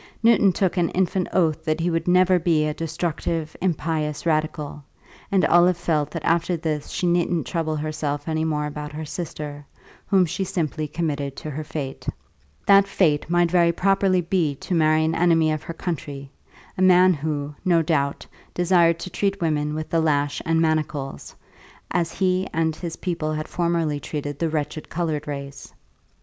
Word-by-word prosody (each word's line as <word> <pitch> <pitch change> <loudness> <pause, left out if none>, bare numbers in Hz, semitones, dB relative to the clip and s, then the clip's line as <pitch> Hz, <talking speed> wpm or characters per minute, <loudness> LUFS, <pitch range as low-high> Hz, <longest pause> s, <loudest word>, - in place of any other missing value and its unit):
Newton 220 -4 +5
took 185 0 0
an 175 -1 +2
infant 185 0 0
oath 160 -3 +1
that 155 0 -1
he 170 +1 0
would 165 +1 -1
never 180 0 +4
be 160 -2 +2
a 150 - -1
destructive, 160 0 -3
impious 160 -4 -1
radical, 155 -2 -1 0.5
and 195 -2 +3
Olive 175 +1 +5
felt 155 -4 0
that 165 - -6
after 170 +1 +1
this 155 -2 -3
she - - -2
needn't 175 -1 +1
trouble 160 -3 -2
herself 150 -1 -3
any 160 0 0
more 150 -2 0
about 150 0 -6
her 155 +1 -5
sister, 150 -2 -6 0.4
whom 190 -2 +4
she 175 +4 -2
simply 160 -4 -2
committed 145 -3 -3
to 155 - -6
her 155 +2 -4
fate. 145 -3 -6 0.6
That 200 0 +6
fate 160 -6 +1
might 175 -1 +2
very 170 -2 +4
properly 190 +1 +2
be 165 -4 0
to 180 - -5
marry 155 -1 +3
an 160 - 0
enemy 165 -2 +3
of 155 -1 -2
her 165 - -7
country, 145 -6 -5 0.4
a - - -3
man 185 0 +6
who, 150 -1 -3
no 170 -3 +3
doubt, 140 -3 0 0.3
desired 175 -2 +4
to 185 - -6
treat 200 -1 -1
women 150 -3 0
with 155 0 -5
the 165 - +2
lash 145 -2 +1
and 165 0 +2
manacles, 155 -4 -2 0.6
as 170 -2 0
he 185 0 +1
and 160 -1 0
his 165 0 -5
people 165 -4 -2
had 155 +1 -3
formerly 170 -4 0
treated 145 -1 -5
the 165 - 0
wretched 150 0 -3
coloured 155 -3 -2
race. 140 -1 -7
160 Hz, 170 wpm, -23 LUFS, 150-175 Hz, 0.6 s, That